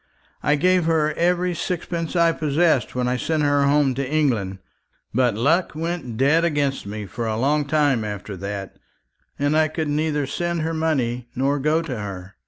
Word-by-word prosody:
"I 145 - +2
gave 180 +2 +3
her 155 -2 +2
every 180 +2 +1
sixpence 170 0 -3
I 170 -1 +4
possessed 155 -3 +1
when 125 -1 0
I 125 0 0
sent 155 +3 0
her 145 -1 +3
home 140 -2 +3
to 135 0 -3
England; 120 -11 0 0.6
but 120 -2 +2
luck 155 - +2
went 165 -8 -4
dead 150 +6 +3
against 145 -8 0
me 105 +1 -5
for 115 +5 -4
a 110 -1 -1
long 145 +4 +1
time 145 -5 +2
after 105 -1 -5
that, 100 +1 -6 0.6
and 145 +2 +1
I 155 0 +4
could 155 0 -3
neither 150 -1 0
send 170 +4 -2
her 165 +1 -1
money 125 -7 -1
nor 140 +3 +1
go 155 +4 +1
to 130 -8 -5
her. 95 -2 -7
145 Hz, 180 wpm, -22 LUFS, 125-160 Hz, 0.6 s, I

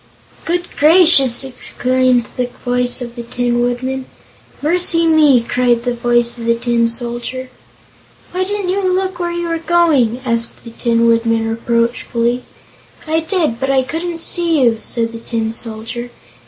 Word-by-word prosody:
"Good 350 +1 -1
gracious!" 305 -6 +5
exclaimed 255 -1 0
the 250 -1 -1 0.2
voice 245 0 0
of 235 -1 -8
the 240 - -5
Tin 240 0 -1
Woodman. 255 +2 -2 0.5
"Mercy 335 +2 +1
me!" 300 -7 +5
cried 245 -2 +1
the 245 0 -1
voice 240 0 0
of 230 - -6
the 230 0 +2
Tin 235 0 +1
Soldier. 240 +2 -4 0.8
"Why 370 +1 -1
didn't 400 -1 -3
you 390 +2 0
look 375 -1 -1
where 345 -1 -2
you 345 0 -3
were 330 0 -2
going?" 315 -9 +2
asked 230 -1 -2
the 230 - -10
Tin 230 0 +1
Woodman 230 -1 +2
reproachfully. 235 +1 -1 0.6
"I 320 0 +1
did, 320 - -1
but 270 +1 -2
I 265 -1 +3
couldn't 330 +4 -4
see 335 -5 +2
you," 230 -2 +2
said 230 -1 -2
the 230 - -8
Tin 225 -1 -3
Soldier. 230 +1 -4
245 Hz, 155 wpm, -16 LUFS, 235-325 Hz, 0.8 s, gracious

